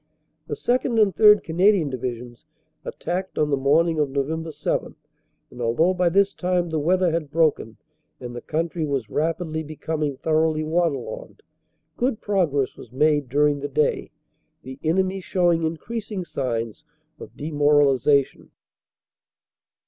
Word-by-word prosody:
"The - - -3
2nd. 245 -1 0
and 205 -3 +4
3rd. 210 -1 +6
Canadian 175 -2 +2
Divisions 120 -1 -6 0.4
attacked 185 +2 -4
on 150 -1 +1
the - - +4
morning 155 +4 +2
of 145 -2 +1
Nov. 160 +4 -3
7 - - -3 0.6
and, 125 - -9
although 140 +11 +2
by 180 -1 +2
this 200 +2 +2
time 180 -1 -1
the 160 - 0
weather 180 +3 +2
had 160 -3 -2
broken 150 -8 0 0.4
and 120 -1 -8
the 120 - -6
country 165 +1 -2
was 135 -7 -2
rapidly 160 +1 -1
becoming 155 -2 -4
thoroughly 155 0 +1
water 160 -2 +1
logged, - - -9 0.5
good 245 -2 0
progress 165 -10 0
was 115 - -13
made 145 0 +1
during 145 +2 +2
the 145 - -4
day, 150 +2 0 0.5
the 130 +1 -9
enemy 190 +4 +1
showing 175 -2 +1
increasing 195 +4 -4
signs 115 -4 -3 0.4
of - - -12
demoralization. 145 -2 +2
155 Hz, 135 wpm, -23 LUFS, 140-180 Hz, 0.6 s, 3rd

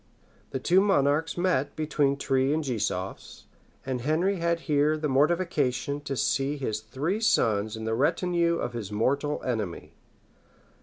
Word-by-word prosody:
The - - -3
two 180 +8 +4
monarchs 160 -5 +2
met 170 -6 0
between 150 -3 +1
Trie 135 0 +1
and 155 +1 0
Gisofs; 105 -7 -4 0.4
and 130 -2 -2
Henry 170 +8 +1
had 170 0 0
here 150 0 +2
the 155 0 -1
mortification 145 -2 +1
to 135 - -3
see 135 +4 0
his 110 -6 -2
three 135 - -3
sons 110 - +1
in 110 - -6
the 110 - -1
retinue 170 +6 +1
of 120 - -3
his 110 -4 -5
mortal 140 +7 0
enemy. 110 -8 -3
140 Hz, 145 wpm, -27 LUFS, 125-160 Hz, 0.4 s, two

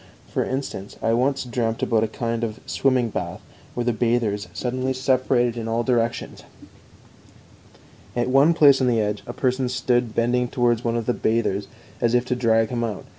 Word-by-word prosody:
For - - -1
instance, 130 -7 -5
I 115 - +2
once 135 +4 +1
dreamt 115 -2 -2
about 110 -2 +2
a - - +1
kind 115 +1 -3
of 110 -2 -3
swimming 130 -3 +1
bath - - -4 0.4
where 120 - -1
the 120 0 +1
bathers 115 -3 0
suddenly 130 +1 -2
separated 130 -2 +1
in 115 -1 -4
all 115 +1 0
directions; 120 -1 -1 1.7
at 120 0 0
one 140 +6 +4
place 140 -4 +6
on 130 - +2
the 120 -2 +2
edge 105 -1 -1
a 120 - -5
person 130 0 0
stood 120 -2 0
bending 120 +1 +1
towards 120 -2 +1
one 115 0 0
of 115 - -3
the 125 - +1
bathers 110 -4 0 0.3
as 120 0 +2
if 125 0 +2
to 125 - -1
drag 115 -2 +2
him 120 -1 -2
out. 110 -4 -4
120 Hz, 180 wpm, -23 LUFS, 115-125 Hz, 1.7 s, place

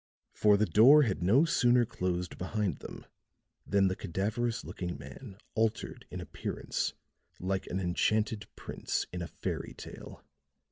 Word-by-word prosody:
For 105 -1 +5
the 110 - +3
door 135 +9 +7
had 100 -7 -1
no 115 - +5
sooner 125 -7 +4
closed 90 -3 -3
behind 100 +1 -1
him - - -8 0.6
than 100 -1 +4
the 95 - 0
cadaverous 110 +6 -2
looking 90 -3 -4
man 85 - -10 0.2
altered 110 -1 -1
in - - -6
appearance - - -3 0.5
like 95 +1 -2
an 95 - -2
enchanted 105 +4 0
prince - - -3
in 90 - -3
a 85 - -3
fairy - - -4
tale. - - -10
100 Hz, 140 wpm, -31 LUFS, 90-110 Hz, 0.6 s, door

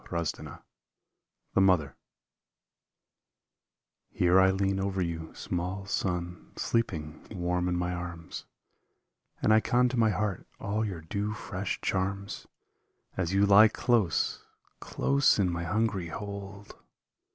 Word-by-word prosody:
149 85 -2 -3 1.0
THE - - +4
MOTHER 85 -8 +3 2.1
Here 90 +1 +4
I 95 0 +6
lean 95 0 0
over 95 0 -1
you, 85 -2 -3
small 90 +3 -3
son, 90 -3 -3
sleeping 80 -10 -2
Warm 90 -2 -1
in 90 - 0
my 90 0 -1
arms, 90 -1 -6 1.0
And 110 - +5
I 110 - +7
con 125 +2 +2
to 125 - -3
my 115 -1 +4
heart 100 -1 -2
all 105 +2 -1
your 95 -6 -4
dew 100 +6 -3
fresh 100 -3 -4
charms, 100 +1 -2 0.7
As 95 0 -1
you 100 +1 +5
lie 100 +2 +8
close, 110 -5 +1 0.4
close 140 0 +2
in 95 -4 +2
my 85 0 -3
hungry 100 -1 0
hold 100 +1 -7
95 Hz, 120 wpm, -29 LUFS, 90-100 Hz, 2.1 s, lie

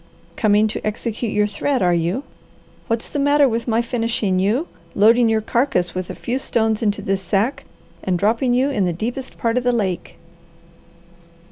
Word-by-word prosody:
Coming 215 0 +3
to - - -5
execute 220 +1 -3
your 210 0 +2
threat, 240 +5 -1
are 175 -1 +3
you? 175 +10 0 0.6
What's 230 0 -1
the 290 - -4
matter 285 0 +4
with 230 0 -2
my 230 0 +2
finishing 230 -5 0
you, 225 - +1 0.3
loading 225 +3 +5
your 220 0 +2
carcass 235 -6 0
with 185 -1 -4
a - - -5
few 250 +3 -3
stones 220 -4 0
into 205 -2 0
this 195 0 -1
sack, 200 +8 -1 0.4
and 185 -2 0
dropping 230 +6 +1
you 265 +3 +2
in 205 -8 +1
the 175 - 0
deepest 245 +9 -4
part 230 +1 0
of - - -7
the 245 - +3
lake." 195 -7 -2
225 Hz, 175 wpm, -20 LUFS, 200-245 Hz, 0.6 s, loading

